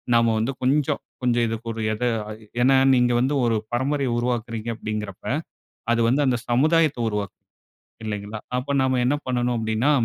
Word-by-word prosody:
நம்ம 115 -1 +4
வந்து 115 +5 0
கொஞ்சம், 140 +2 +1 0.2
கொஞ்சம் 120 -1 +2
இதுக்கு 115 +1 -5
ஒரு 110 - -5
எத 110 - -4 0.6
ஏன்னா, 135 +1 +5 0.2
நீங்க 125 -1 +3
வந்து 130 +3 +1
ஒரு 115 -1 +2 0.2
பரம்பரைய 135 +2 0
உருவாக்குறீங்க 120 -2 -2
அப்படிங்கிறப்ப, 105 -4 -5 0.7
அது 120 0 +2
வந்து 135 +5 +2
அந்த 125 -2 +2
சமுதாயத்த 155 +3 +3
உருவாக்கும். 105 -1 -4 0.7
இல்லைங்களா, 105 0 -4 0.2
அப்ப 135 +3 -3
நாம 130 -1 +1
என்ன 135 - +2
பண்ணணும் 125 -1 0
அப்டின்னா, 110 +5 +1
120 Hz, 150 wpm, -23 LUFS, 110-130 Hz, 0.7 s, ஏன்னா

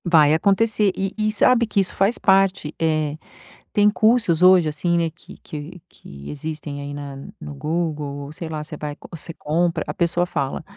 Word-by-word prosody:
Vai 155 -4 +5
acontecer, 205 +4 +2
e 195 0 -1
e 215 0 0
sabe 235 +2 +3
que 205 - 0
isso 190 - 0
faz 200 +5 +2
parte, 190 -5 +2
eh, 155 -2 0 0.6
tem 205 0 +5
cursos 215 -6 +2
hoje, 180 -3 +6
assim, 170 +3 0
né, 165 -1 +1
que - - -15
que 160 +4 -9
que 70 0 -12
existem 150 -1 -6
aí 140 0 -6
na 145 -1 -7 0.3
no 75 -1 -7
Google 150 - -3
ou 140 - -9
sei 160 +2 -7
lá 155 -1 -4
você 150 - -9
vai 150 -1 -5 0.2
você 165 0 -8
compra, 165 +1 0
a 150 - -3
pessoa 170 +1 0
fala 140 -5 -3
165 Hz, 185 wpm, -22 LUFS, 150-190 Hz, 0.6 s, hoje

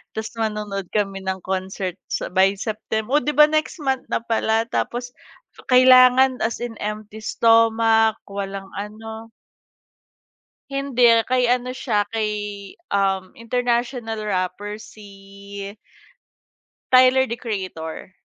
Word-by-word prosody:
Tas 220 0 -4
manonood 210 -3 -3
kami 195 -2 -1
ng 190 -1 -3
concert 190 -1 -3
sa - - -3
by 190 +2 +4
Septem 220 +1 -4
o 295 - +5
di 295 0 -2
ba, 300 - +8
next 310 +1 -1
month 265 -2 -1
na - - -1
pala. 225 -1 +1
Tapos 245 +1 -2 0.6
kailangan 255 0 +6
as 225 +2 -2
in 230 -2 -6
empty 210 +1 -6
stomach, 225 0 +3
walang 195 -1 -5
ano. 220 +2 -8 1.4
Hindi, 245 -5 +3
kay 250 -1 +1
ano 250 0 +1
siya 215 -5 0
kay, 220 -2 -1 0.6
uhm 195 -2 0
international 235 -1 -2
rapper. 205 +1 -3
Si 200 -1 -11 1.2
Tyler, 255 +1 +6
The 235 -2 -5
Creator. 185 -7 -6
220 Hz, 115 wpm, -22 LUFS, 200-245 Hz, 1.4 s, ba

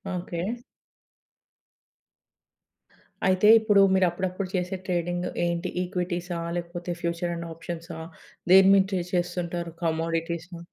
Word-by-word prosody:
Okay. 175 -1 -4 2.8
అయితే 185 +2 +4
ఇప్పుడు 210 -2 +4
మీరు 190 -1 +4
అప్పుడప్పుడు 185 +2 -3
చేసే 180 +1 -1
ట్రేడింగ్ 175 -1 -1 0.2
ఏంటి 170 +1 -1
ఈక్విటీసా? 180 -1 -3 0.2
లేకపోతే 175 0 -5
ఫ్యూచర్ 170 0 -2
అండ్ 170 0 -6
ఆప్షన్సా? 165 0 -7 0.5
దేని 190 0 +8
మీద 195 - +5
ట్రేడ్ 180 -2 -2
చేస్తుంటారు 175 -1 -2
కమోడిటీసా? 165 +1 -2
175 Hz, 100 wpm, -26 LUFS, 170-185 Hz, 2.8 s, దేని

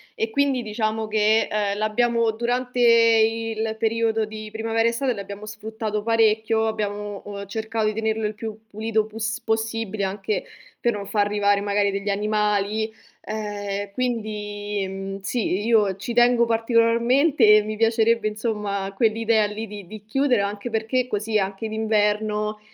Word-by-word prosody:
e 225 0 -2
quindi 275 -2 +1
diciamo 215 0 -2
che, 215 +1 +3
ehm, 205 -1 -1
l'abbiamo 230 +2 +1
durante 245 +2 -2
il 225 -1 +3
periodo 225 0 +1
di 215 0 -8
primavera 225 +1 0
estate 250 +2 0
l'abbiamo 200 0 -7
sfruttato 215 0 -4
parecchio, 220 0 +2
abbiamo, 205 -2 -3
uhm, 200 -1 -6
cercato 220 +2 -2
di 215 - +1
tenerlo 220 0 -1
il 210 - -1
più 220 0 -7
pulito 220 0 -1
pus 220 +1 -4
possibile 220 -2 -2
anche 195 +1 -2 0.4
per 240 - +1
non 205 -1 -5
far 205 0 +1
arrivare 205 -1 +2
magari 200 0 +1
degli 200 +1 -3
animali, 210 +1 0 0.3
ehm, 205 -2 -4
quindi, 210 -4 -3
mhmm, 195 +1 -5
sì, 195 -2 -1
i - - -4
io 210 -4 +3
ci 210 +5 -5
tengo 240 0 +5
particolarmente 230 +2 +4
e - - +4
mi 215 +1 -5
piacerebbe, 225 0 +2
insomma, 210 -3 -2
quell'idea 225 0 +2
lì 215 +2 -5
di 205 -1 -9
di 215 +3 -10
chiudere, 250 0 +2
anche 200 +3 -3
perché 225 +3 0
così 215 -1 -1
anche 195 +2 -2
d'inverno 215 -1 0
215 Hz, 150 wpm, -23 LUFS, 210-225 Hz, 0.4 s, tengo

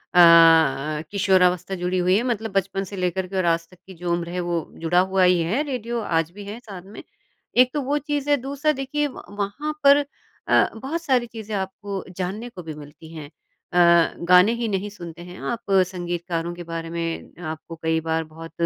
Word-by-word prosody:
अ - - +6
अ, 160 -4 +6
किशोरावस्था 185 -2 +2
जुड़ी 180 0 -2
हुई 180 +1 +3
है। 235 - 0
मतलब 225 -4 -2
बचपन 195 0 -1
से 200 - -7
लेकर 185 0 -1
के 195 - -8
और 185 - +1
आज 165 0 +1
तक 180 - -18
की 190 - -11
जो 175 0 -4
उम्र 170 0 -2
है, 180 +1 -3
वो 175 -2 -2 0.2
जुड़ा 175 +2 +3
हुआ 190 0 +2
ही 180 -1 +4
है 190 - 0
रेडियो 240 -3 -3
आज 165 -4 0
भी 205 +2 -10
है 210 +4 -7
साथ 195 -6 -10
में - - -9 0.6
एक 255 - -7
तो 295 - -1
वो 280 +3 0
चीज़ 290 0 -3
है, 290 - +4
दूसरा, 280 +4 -1
देखिए, 290 +1 -2
व 265 - -10
वहाँ 205 +10 -3
पर 285 +1 +6 0.4
अ, - - +4
बहुत 275 +9 -4
सारी 255 -5 +1
चीज़ें 220 -2 -8
आपको 195 0 -4
जानने 200 +6 -4
को 185 -6 -10
भी 160 -1 -6
मिलती 150 +2 -13
हैं। 155 -3 -8
अ, 170 +2 +1 0.2
गाने 180 +5 +7
ही 235 -1 -2
नहीं 200 0 -2
सुनते 175 -4 -10
हैं 180 - -10
आप, 230 -4 -4 0.2
संगीतकारों 175 -1 -3
के 175 - -8
बारे 165 -1 -5
में 165 +1 -5
आपको 160 +1 -9
कई 160 0 0
बार 160 0 0
बहुत 165 +1 -11
185 Hz, 205 wpm, -23 LUFS, 170-225 Hz, 0.6 s, गाने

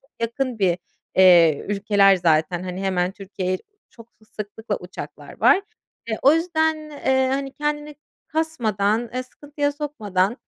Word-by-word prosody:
çok 270 - -32
yakın 235 +1 -2
bir, 180 -3 +2 0.4
eee, 170 -5 +6
ülkeler 200 -1 +4
zaten, 170 +1 +1
hani, 185 +1 -5
hemen 185 -1 0
Türkiye'ye 190 -2 -4 0.3
çok 230 -1 -15 0.3
sıklıkla 210 0 -4
uçaklar 180 +1 -10
var. 390 - +5 0.5
Eee, 220 - -2
o 280 - +7
yüzden, 320 -1 +1 0.2
eee, 265 -2 +1
hani, 270 0 -2
kendini 295 0 -3 0.3
kasmadan, 230 -8 0
eee, 255 - -1
sıkıntıya 290 +2 -3
sokmadan... 225 -8 -1
220 Hz, 130 wpm, -22 LUFS, 190-285 Hz, 0.5 s, o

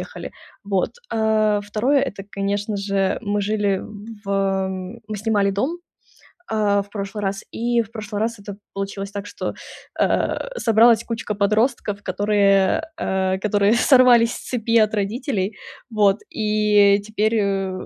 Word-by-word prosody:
ехали. - - -7 0.3
Вот, 195 -2 0 0.2
а, 215 -1 +2
2- 230 +8 +1
это 200 -7 -4
конечно 200 +1 -2
же 195 -1 0
мы 205 -1 -1
жили 205 -1 0 0.4
в - - -10 0.8
мы 215 - -4
снимали 205 -1 +1
дом, 265 - -2 0.7
а, 205 -2 +1
в 200 - -21
прошлый 205 0 -5
раз, 195 0 -2
и 235 0 +1
в 220 - -9
прошлый 210 -2 -5
раз 230 +1 -1
это 200 0 -9 0.2
получилось 195 0 -5
так, 200 0 -6
что, - - -5 0.5
а, - - 0
собралась 230 0 +5
кучка 225 -2 -4
подростков, 210 0 0
которые, 200 +4 +2 0.2
э, 190 0 0
которые 205 +1 +2
сорвались 245 -2 +5
с - - -9
цепи 230 -2 +1
от 215 - -2
родителей, 210 -1 -2 0.3
вот, 205 -3 +3
и 210 -2 +3
теперь, 215 +2 -1
э, 195 -2 0
210 Hz, 140 wpm, -21 LUFS, 200-225 Hz, 0.8 s, собралась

